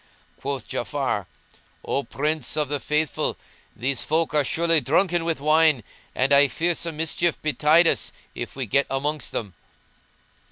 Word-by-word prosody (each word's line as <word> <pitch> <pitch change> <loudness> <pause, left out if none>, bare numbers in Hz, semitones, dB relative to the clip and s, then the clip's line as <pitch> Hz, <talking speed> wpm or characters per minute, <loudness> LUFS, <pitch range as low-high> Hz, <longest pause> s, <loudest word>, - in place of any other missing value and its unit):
Quoth - - -4
Ja'afar, - - -2 0.6
"O 140 - 0
Prince 150 0 -2
of 150 -3 0
the 145 -1 -1
Faithful; 150 +2 -1 0.4
these 130 +3 0
folk 160 0 0
are 150 -1 +3
surely 165 +3 +2
drunken 175 +4 +2
with 165 -3 -1
wine, 155 -3 +3 0.3
and 135 +2 +2
I 140 0 +6
fear 170 +6 0
some 165 -2 -3
mischief 165 +1 0
betide 155 +2 +4
us - - +1 0.2
if - - -6
we 135 -1 -3
get 140 +6 +1
amongst 145 +1 -2
them." 100 -5 -4
150 Hz, 150 wpm, -24 LUFS, 140-160 Hz, 0.6 s, I